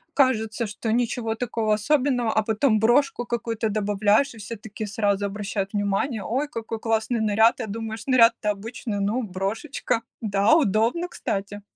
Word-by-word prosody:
кажется, 230 -4 +2
что 220 +2 -3
ничего 235 -2 0
такого 225 -3 -1
особенного, 245 0 +1
а 220 - +2
потом 220 +1 +2
брошку 245 +4 +2
какую-то 230 -2 -2
добавляешь, 210 +4 +2
и - - -14
все 220 +2 -6
такие 215 0 -7
сразу 205 -1 0
обращают 200 0 -3
внимание: 205 +3 -1
"Ой, 265 +6 -1
какой 225 -4 -5
классный 225 +1 0
наряд!" 220 +1 +3
Я - - -3
думаю, 220 +1 -5
что 260 - -4
наряд-то 230 -3 +5
обычный. 205 0 -5
Ну, 225 +5 0
брошечка. 220 +5 -2 0.2
Да, 205 +4 +3
удобно, 245 - +1
кстати. 205 +1 -4
220 Hz, 155 wpm, -24 LUFS, 205-240 Hz, 0.2 s, наряд-то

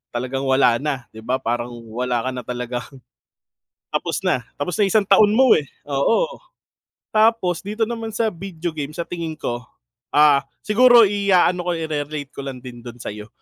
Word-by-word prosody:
talagang 130 +3 -2
wala 130 -3 +4
na, 140 -3 -2
'di 110 - -11
ba, 125 +4 -1
parang 120 -1 -3
wala 125 0 -1
ka 130 - -1
na 125 -1 -6
talagang 125 0 -4 1.0
Tapos - - -2
na 125 -2 0
tapos 160 +4 -3
na 205 - +4
yung - - -2
isang 215 - +5
taon 205 +1 +6
mo 260 +1 +5
eh, 145 - -8 0.2
oo. 230 - +1 0.7
Tapos 215 -6 +3
dito 210 +3 -1
naman 225 0 -5
sa 225 -1 0
video 175 -2 -5
game, 150 -1 -5
sa 170 - -2
tingin 165 -3 -5
ko, 120 -5 -3 0.5
ah, 145 -1 +6 0.2
siguro 240 +2 +7
iaano 185 -3 +2
ko, - - +2
ire-relate 150 -3 -4
ko - - -8
lang 130 -2 -6
din 120 -2 -9
dun 120 0 -10
sa'yo. 105 +1 -7
150 Hz, 175 wpm, -21 LUFS, 125-200 Hz, 1.0 s, siguro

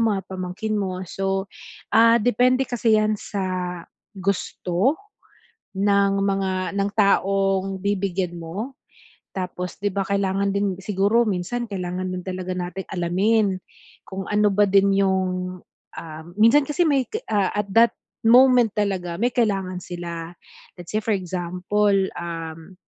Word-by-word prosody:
mga 215 -4 +2
pamangkin 185 +3 -4
mo, 190 -3 -2
so 195 +1 -2 0.5
ah, 230 +1 +6
depende 250 +3 +3
kasi 230 -3 +2
'yan 215 0 +2
sa 185 -3 -3 0.3
gusto 195 - 0 0.8
ng 200 0 +3
mga, 195 -1 -1
ng 200 0 0
taong 195 -1 +2
bibigyan 190 -2 -1
mo. 210 +11 -5 0.6
Tapos, 180 -1 -4
'di 205 0 -2
ba 195 0 -2
kailangan 200 0 0
din 200 -2 0
siguro 205 +4 +2
minsan 210 +5 -2
kailangan 185 -2 -4
din 180 - -6
talaga 185 -1 -4
nating 180 +1 -5
alamin 190 +3 +1 0.5
kung 190 0 -5
ano 210 0 +3
ba 205 +2 +3
din 195 0 +4
yung, 185 -2 0 0.4
ah, 160 -1 -9 0.2
minsan 230 +7 +6
kasi 295 +5 0
may, 275 -3 +3 0.2
ah, 200 -3 +1
at 210 -1 -2
that 230 0 +6 0.3
moment 245 -1 +6
talaga 190 -5 -1
may 240 +3 +2
kailangan 195 -6 0
sila. 170 -1 -6 0.5
Let's 175 - -9
say 215 - +2
for 225 - -1
example, 185 +3 0 0.2
um, 165 +1 -7
195 Hz, 130 wpm, -23 LUFS, 185-210 Hz, 0.8 s, ah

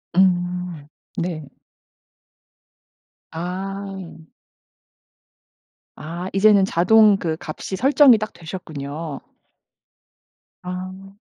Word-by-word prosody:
음. 180 -4 +1 0.3
네. 165 -4 -3 1.8
아. 190 0 -6 1.7
아 170 +4 -6
이제는 200 0 +5
자동 205 +4 +5
그 160 -4 -2
값이 165 +4 -6
설정이 270 +2 +6
딱 215 0 -5
되셨군요. 155 -3 -7 1.4
아. 185 +2 -7
180 Hz, 110 characters per minute, -22 LUFS, 165-195 Hz, 1.8 s, 설정이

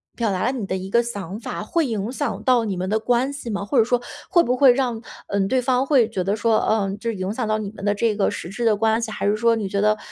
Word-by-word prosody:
表 230 -3 0
达 185 -1 -1
了 255 - +2
你 240 -7 -4
的 190 - -2
一 190 0 -5
个 235 +3 +4
想 205 -3 -6
法， 215 - -5
会 330 +7 0
影 220 0 -3
响 285 +2 -3
到 245 -3 +3
你 200 - -2
们 185 +1 -3
的 220 +1 +1
关 245 +4 +1
系 280 -4 -7
吗？ 200 -1 -2
或 255 - -1
者 225 - +7
说， 245 +1 0 0.3
会 345 -1 +5
不 250 -2 0
会 260 -3 +7
让 245 -4 -1 0.3
嗯， 200 -1 0
对 255 +4 +1
方 255 +1 +1
会 265 -6 +4
觉 195 -5 -2
得 200 +3 0
说， 225 0 +2
呃 200 -3 0
这 230 -1 -2
影 190 +1 -3
响 235 -2 -2
到 215 0 +1
你 210 -2 -5
们 205 - -11
的 205 0 +2
这 225 0 +1
个 200 - +1
实 170 - -6
质 230 +5 -3
的 220 - +4
关 220 +2 +1
系， 225 - -3
还 - - -4
是 205 +1 +2
说 230 +1 +3
你 210 -3 -3
觉 200 +1 -1
得， 215 0 +3
220 Hz, 320 characters per minute, -22 LUFS, 200-245 Hz, 0.3 s, 者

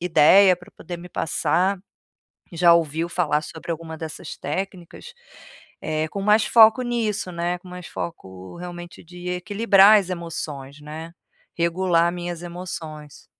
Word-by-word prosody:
ideia 180 +3 +6
pra 175 - -17
poder 175 +1 -8
me 175 +1 -10
passar, 185 +3 0 0.7
já 170 0 +5
ouviu 165 0 -1
falar 150 -4 0
sobre 160 +2 -7
alguma 160 0 -6
dessas 160 -1 -7
técnicas, 185 - -6 0.7
eh, 155 0 -2
com 200 - -5
mais 210 +2 +4
foco 225 +2 +6
nisso, 220 -6 -2
né, 175 +1 -2
com 185 - -16
mais 180 0 -9
foco 95 - -8
realmente 175 0 -9
de 180 +1 -8
equilibrar 200 +2 +5
as 190 -2 -5
emoções, 155 -5 -6
né, 155 +2 -8 0.4
regular 170 0 +2
minhas 175 -1 -6
emoções. 160 -4 -8
175 Hz, 135 wpm, -23 LUFS, 160-185 Hz, 0.7 s, ideia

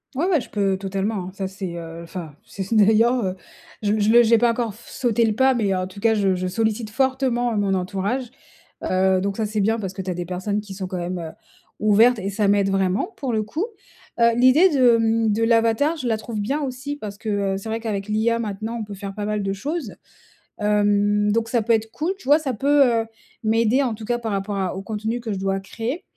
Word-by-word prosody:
Ouais 300 +6 0
ouais, 340 -5 +3
je - - -9
peux 195 -2 0
totalement, 195 +2 -2
hein. 185 - -7
Ça, 195 -1 -3
c'est, 190 -3 -6
heu 165 0 -8
enfin, 165 -2 -7
si 195 - -6
ce 195 +5 -4
n'est 215 -2 +6
d'ailleurs, 230 +2 +3
heu, 185 0 -2 0.5
je 205 - 0
m 215 - +1
je 205 - +2
le 235 +1 +7
j'ai 230 0 +5
pas 235 +1 +3
encore 230 -3 -2
f 230 - -17
sauté 235 -3 +1
le 215 -1 0
pas, 265 +2 +4
mais 205 -6 0
en 185 0 -1
tout 190 +2 -10
cas, 225 +1 +3
je 200 -3 +2
je 185 0 -2
sollicite 220 +3 -1
fortement, 245 -1 0
mon 200 -1 +1
entourage. 200 +7 -2 0.5
Heu, 185 0 +2
donc 200 +1 -2
ça, 220 - -1
c'est 215 0 -2
bien 220 +3 +1
parce 195 -4 -4
que 190 - -5
tu 185 - -4
as - - -2
des 175 0 -4
personnes 185 +4 -2
qui 205 -2 -10
sont 185 -1 -5
quand 185 - -4
même, 175 +1 -3
heu, 160 -1 -6 0.5
ouvertes 220 +3 +4
et 195 0 -3
ça 200 0 0
m'aide 200 -1 +3
vraiment, 195 - 0
pour 265 -4 -3
le 215 -1 0
coup. 310 - -3 0.5
Heu, 235 0 +4
l'idée 255 +10 +6
de, 255 -5 +5
hem, 225 -1 +2
de 225 +2 +1
l'avatar, 230 +7 +2
je 260 -6 -3
la 225 - +2
trouve 220 0 -5
bien 270 +9 -1
aussi 270 +2 -4
parce 210 -7 -7
que, 220 - -8 0.3
heu, - - -1
c'est 195 +3 -7
vrai 225 - -1
qu'avec 210 -3 -4
l'IA 225 +2 +1
maintenant, 215 +1 -4
on - - -2
peut 205 -1 -8
faire 195 0 -7
pas 205 0 -4
mal 210 -1 -1
de 195 - -1
choses. 275 - -4 0.7
Hem, 205 0 +2
donc 230 +1 0
ça 230 0 +1
peut 230 - -1
être 220 -1 +2
cool, 340 +9 -2
tu - - -17
vois? 290 +3 +6
Ça 275 -5 -3
peut, 280 +4 +4 0.2
heu, - - -11 0.4
m'aider 225 +4 +3
en 245 -4 0
tout 220 - -11
cas 240 +2 -1
par 225 -3 -3
rapport 200 +1 -2
à 190 -2 -2
au 190 - -5
contenu 220 +3 -3
que 230 -2 -4
je 195 - -3
dois 195 0 -1
créer. 235 - -5
215 Hz, 250 wpm, -22 LUFS, 195-235 Hz, 0.7 s, le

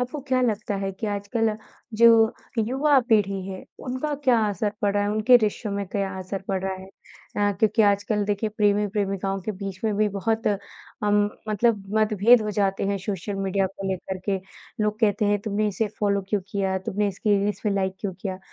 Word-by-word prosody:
आपको 250 +4 -3
क्या 255 -1 +2
लगता 215 -4 0
है 195 0 -2
कि 205 +3 -5
आजकल 210 +2 -1 0.4
जो 235 - +8 0.5
युवा 270 +6 +3
पीढ़ी 200 -4 +2
है, 190 -1 -7 0.2
उनका 260 +4 -2
क्या 250 -3 +5
असर 205 +1 -1
पड़ा 205 0 +2
है? 205 - 0
उनके 215 +4 +6
रिश्तों 215 -1 -1
में 200 -1 -2
क्या 195 0 -2
असर 190 +1 -5
पड़ 190 -1 0
रहा 190 - -1
है? 190 0 -10 0.5
अ, 205 0 +2
क्योंकि 220 +1 +3
आजकल 205 0 +2
देखिए 205 +1 -1
प्रेमी-प्रेमिकाओं 200 -2 0
के 215 - -3
बीच 195 -1 -7
में 215 -1 +1
भी 210 0 +3
बहुत 220 +3 -1
अम 205 0 -1 0.2
मतलब 215 0 +2 0.2
मतभेद 215 +2 +5
हो 210 - -2
जाते 195 -2 0
हैं 200 - 0
सोशल 195 +1 -4
मीडिया 195 0 0
को 195 +1 -7
लेकर 190 0 -3
के। 195 - +2 0.5
लोग 210 0 0
कहते 215 -1 +2
हैं 205 0 +2
तुमने 215 0 0
इसे 210 +2 -1
फ़ॉलो 200 -1 +1
क्यों 205 -1 +1
किया? 195 -1 0
तुमने 205 +2 -1
इसकी 200 +1 +1
रील्स 205 +1 -1
पे 210 - +2
लाइक 190 -1 0
क्यों 200 -3 -3
किया? 190 -2 -3
205 Hz, 190 wpm, -24 LUFS, 195-215 Hz, 0.5 s, जो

